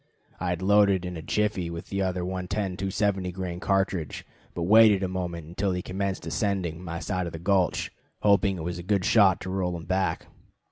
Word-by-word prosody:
I 90 - -2
had 90 +1 -2
loaded 100 -2 +4
in 90 0 -5
a 80 - -6
jiffy 105 -1 -1
with 85 0 -7
the 100 0 -1
other 90 -2 -1
110 95 +1 -3
270 95 -1 -1
grain 90 -1 -4
cartridge, 95 -6 -1 0.3
but 85 - -2
waited 105 +1 +6
a - - +1
moment 90 -3 -4
until 95 +4 -2
he 90 0 -3
commenced 95 0 -3
ascending 90 -5 -2
my 85 -1 -5
side 90 0 -2
of 85 - -7
the - - -5
gulch, 90 +1 +1 0.3
hoping 100 -4 +3
with 85 +1 -4
a - - -4
good 95 +1 0
shot 100 -5 +5
to 95 - -5
roll 90 -2 -1
him 80 - -9
back. 95 +3 -1
95 Hz, 195 wpm, -26 LUFS, 90-100 Hz, 0.3 s, waited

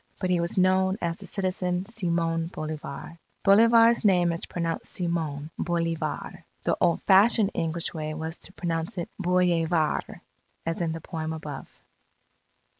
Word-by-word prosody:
But 185 -2 -1
he 180 - +3
was 170 +2 -2
known 190 +1 +3
as 170 0 -2
the 200 - -9
citizen, 185 -2 -1
Simon 170 -6 -1
Bolivar 155 0 -6 0.2
Bolivar's 230 +3 +6
name 180 -4 +4
is 165 - -4
pronounced, 165 -1 -3
Seemon 160 -4 -2
Boleevar 165 -2 -2 0.2
The - - +1
old 170 - +2
fashioned 205 +2 +5
English 165 0 -2
way 155 -1 -4
was 160 +1 -5
to 190 - -4
pronounce 170 +3 -3
it 170 - -3
Bollevaar, 175 -3 +1 0.4
as 165 +1 -2
in 165 -2 0
the 165 - -6
poem 160 -1 -4
above. 150 -3 -8
170 Hz, 140 wpm, -26 LUFS, 165-185 Hz, 0.4 s, Bolivar's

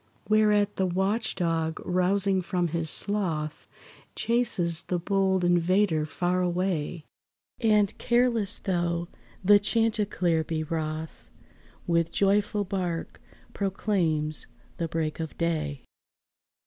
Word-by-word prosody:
Whereat 210 -1 +3
the 190 - +1
watch 195 +5 0
dog 165 -3 -1
rousing 190 +1 +2
from 175 -1 -1
his 165 0 -2
sloth, 165 -8 -2 0.5
Chases 215 -8 +1
the 180 - -2
bold 190 0 +1
invader 175 -2 +2
far 180 +3 0
away, 175 -3 -1 0.5
And, 210 -3 +3
careless 240 -4 +2
though 175 -2 -1 0.4
the 205 +1 +7
chanticleer 205 -7 +1
be 155 0 -2
wroth, 155 0 -4 0.6
With 170 -1 +1
joyful 205 +1 +2
bark 180 -3 -3 0.3
proclaims 180 -6 -1 0.3
the 165 - -1
break 160 -1 -2
of 160 -1 -5
day. 155 -5 -2
180 Hz, 105 wpm, -27 LUFS, 165-205 Hz, 0.6 s, the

